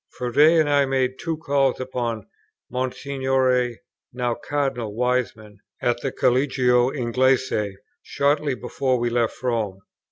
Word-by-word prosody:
Froude 120 Hz, -1 st, -6 dB
and 155 Hz, +1 st, +6 dB
I 145 Hz, -1 st, +3 dB
made 130 Hz, -1 st, -1 dB
two 165 Hz, -1 st, -3 dB
calls 140 Hz, -4 st, +1 dB
upon 120 Hz, -4 st, -3 dB, 0.5 s
Monsignore 130 Hz, -1 st, 0 dB, 0.4 s
(now 125 Hz, -1 st, -1 dB
Cardinal) 135 Hz, -7 st, -3 dB
Wiseman 115 Hz, -4 st, -2 dB, 0.2 s
at 120 Hz, 0 st, 0 dB
the 135 Hz, -, -2 dB
Collegio 125 Hz, -1 st, +2 dB
Inglese, 125 Hz, -5 st, 0 dB, 0.2 s
shortly 145 Hz, -1 st, 0 dB
before 130 Hz, 0 st, -1 dB
we 120 Hz, 0 st, -1 dB
left 120 Hz, 0 st, -1 dB
Rome. 110 Hz, -6 st, -1 dB
125 Hz, 120 wpm, -23 LUFS, 120-135 Hz, 0.5 s, and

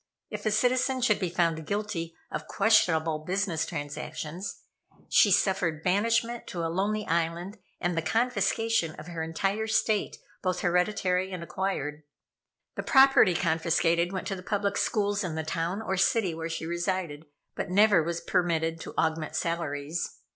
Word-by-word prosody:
If -, -, -4 dB
a -, -, +2 dB
citizen 255 Hz, +4 st, +2 dB
should 220 Hz, -4 st, +3 dB
be 185 Hz, -3 st, -1 dB
found 165 Hz, -3 st, 0 dB
guilty 200 Hz, -6 st, -3 dB, 0.2 s
of -, -, -5 dB
questionable 165 Hz, -8 st, +3 dB
business 175 Hz, -1 st, -1 dB
transactions, 150 Hz, +3 st, -6 dB, 0.5 s
she 210 Hz, -, +6 dB
suffered 180 Hz, -5 st, +1 dB
banishment 230 Hz, +5 st, +1 dB
to 170 Hz, -5 st, -3 dB
a 165 Hz, -, -2 dB
lonely 210 Hz, +3 st, 0 dB
island 170 Hz, +5 st, -2 dB, 0.2 s
and 175 Hz, -1 st, -1 dB
the 165 Hz, -, +1 dB
confiscation 225 Hz, -1 st, +1 dB
of 155 Hz, -, -10 dB
her 170 Hz, -2 st, -4 dB
entire 195 Hz, +7 st, -1 dB
estate, 220 Hz, -1 st, 0 dB, 0.2 s
both 185 Hz, -1 st, -1 dB
hereditary 180 Hz, +1 st, +1 dB
and 180 Hz, -2 st, -5 dB
acquired. 155 Hz, -4 st, -3 dB, 0.7 s
The -, -, -4 dB
property 270 Hz, -9 st, +6 dB
confiscated 170 Hz, +1 st, +1 dB
went 190 Hz, -1 st, -4 dB
to 195 Hz, -, -2 dB
the 185 Hz, -, -8 dB
public 200 Hz, +1 st, -1 dB
schools 205 Hz, -2 st, 0 dB
in 170 Hz, -4 st, -3 dB
the 160 Hz, -, -2 dB
town 165 Hz, +6 st, -2 dB
or 190 Hz, -2 st, -1 dB
city 195 Hz, -1 st, +2 dB
where 165 Hz, +1 st, -4 dB
she 160 Hz, 0 st, -4 dB
resided; 170 Hz, -3 st, -3 dB, 0.3 s
but -, -, -4 dB
never 200 Hz, -1 st, +5 dB
was 170 Hz, +1 st, -3 dB
permitted 165 Hz, -3 st, 0 dB
to -, -, -9 dB
augment 160 Hz, -1 st, 0 dB
salaries. 160 Hz, -2 st, -2 dB
180 Hz, 155 wpm, -28 LUFS, 165-205 Hz, 0.7 s, she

